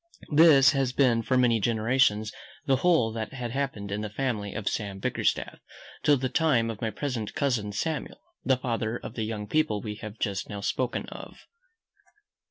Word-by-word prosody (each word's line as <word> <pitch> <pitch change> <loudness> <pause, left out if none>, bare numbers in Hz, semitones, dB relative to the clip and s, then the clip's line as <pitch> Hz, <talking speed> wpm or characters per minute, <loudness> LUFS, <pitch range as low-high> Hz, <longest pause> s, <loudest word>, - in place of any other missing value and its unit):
This 145 -3 +7
had 135 -3 0
been 125 -4 +3
for 130 +3 +1
many 120 -3 +3
generations, 110 0 +2 0.3
the 135 -3 +3
whole 145 -7 +3
that 110 0 -5
had 125 -3 -4
happened 125 -7 -3
in 105 +1 -2
the 105 - -4
family 105 -3 -2
of 105 0 -4
Sam 100 -3 -2
Bickerstaff, 95 - -1 0.4
till 145 -1 +4
the 130 +1 -1
time 125 -6 +2
of 110 - -9
my 115 - 0
present 115 -1 -4
cousin 120 -8 0
Samuel, 155 +10 -3 0.2
the 130 -1 +3
father 115 -2 -2
of - - -8
the 110 - -3
young 110 -1 -4
people 110 -3 +1
we 105 +1 -5
have 110 0 -8
just 100 -4 -2
now 100 -2 -5
spoken 125 +4 -1
of. - - -11
115 Hz, 180 wpm, -27 LUFS, 105-135 Hz, 0.4 s, This